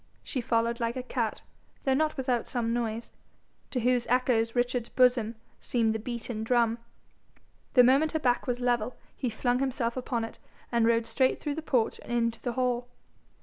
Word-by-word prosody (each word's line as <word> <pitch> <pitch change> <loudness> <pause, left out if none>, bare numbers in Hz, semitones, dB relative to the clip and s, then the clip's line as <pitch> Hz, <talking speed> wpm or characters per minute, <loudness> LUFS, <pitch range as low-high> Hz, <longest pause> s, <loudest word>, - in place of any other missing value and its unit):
She 260 - -3
followed 230 0 +1
like 230 0 -1
a 255 - -3
cat, 240 -3 -2 0.4
though 265 - +2
not 305 +3 +1
without 250 -3 0
some 230 -2 -1
noise, 230 -1 -2 0.6
to 250 - -1
whose 245 0 +2
echoes 245 -2 +2
Richard's 245 -1 0
bosom 245 -3 +3 0.2
seemed 225 -3 +1
the 220 - -2
beaten 235 -1 -4
drum. 235 0 +2 1.0
The 250 - +9
moment 275 +5 +4
her 315 - +1
back 245 -3 +1
was 245 -1 -1
level, 245 -1 0 0.2
he 250 - -2
flung 245 +3 0
himself 255 -3 -1
upon 245 -2 -2
it, 225 - -7 0.3
and 235 -1 +3
rode 230 0 +3
straight 260 +1 +1
through 295 - -2
the 320 - -4
porch 250 -7 0
and - - -9
into 230 -1 0
the 245 - -2
hall. 245 -1 0
245 Hz, 180 wpm, -29 LUFS, 230-255 Hz, 1.0 s, The